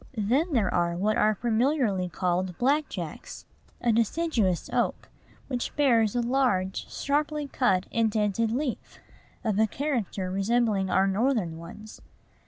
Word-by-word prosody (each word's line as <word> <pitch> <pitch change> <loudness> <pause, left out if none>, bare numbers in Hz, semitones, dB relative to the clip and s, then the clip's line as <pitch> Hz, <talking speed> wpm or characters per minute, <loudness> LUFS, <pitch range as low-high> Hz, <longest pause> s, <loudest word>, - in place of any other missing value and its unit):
Then 265 - +1
there 220 -7 +1
are 170 -1 +1
what 210 +4 +1
are 215 -2 +3
familiarly 230 -4 +1
called 180 +1 -1
black 285 +4 +1
jacks, - - -7 0.4
a 240 - +2
deciduous 225 - +1
oak, - - -1 0.4
which 250 -3 -3
bears 235 -7 +3
a 245 - +2
large, 235 -7 0
sharply 295 +1 -1
cut, 195 -9 +1
indented 220 -1 +1
leaf, 255 +2 -3 0.5
of 215 -3 0
a 220 - +4
character 220 -8 -2
resembling 200 0 +1
our 190 - +3
Northern 195 -5 0
ones. 210 +6 -11
220 Hz, 130 wpm, -27 LUFS, 190-260 Hz, 0.5 s, a